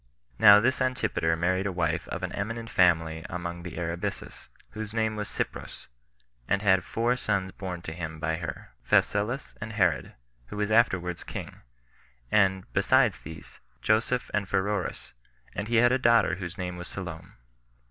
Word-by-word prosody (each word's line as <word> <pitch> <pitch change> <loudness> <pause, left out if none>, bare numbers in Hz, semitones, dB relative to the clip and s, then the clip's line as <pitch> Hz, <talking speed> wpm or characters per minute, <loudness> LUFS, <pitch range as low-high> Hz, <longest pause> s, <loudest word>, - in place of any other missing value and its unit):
Now 105 0 +9
this 130 +5 +1
Antipater 125 -10 +1
married 95 +4 0
a - - -1
wife 85 -2 -1
of - - -5
an - - -2
eminent 115 +3 -4
family 80 -3 +3
among 85 0 -5
the 85 -2 -8
Arabisus, 85 0 -4 0.2
whose 110 0 -6
name 110 -1 +1
was 105 -1 -4
Cypros, - - -5 0.6
and 100 +1 +1
had 95 -2 +4
four 120 +5 0
sons 100 -6 -1
born 90 -3 -6
to 80 - -5
him 80 -2 -6
by 80 0 -1
her, 80 -1 -7
Phasaelus 115 +7 +1
and 110 +1 -5
Herod, 90 - +1 0.3
who 105 - -8
was 105 0 -1
afterwards 95 -6 +2
king, - - -7 0.7
and, 95 -2 +3
besides - - +3
these, 80 +1 -11 0.2
Joseph 115 - +1
and 100 -2 -1
Pheroras; 100 0 -2 0.4
and 105 - -4
he 120 - 0
had 120 +2 +5
a 130 - +2
daughter 115 -6 +4
whose 90 0 -6
name 90 -2 -4
was 90 - -7
Salome. 85 -4 -7
95 Hz, 160 wpm, -27 LUFS, 85-110 Hz, 0.7 s, Now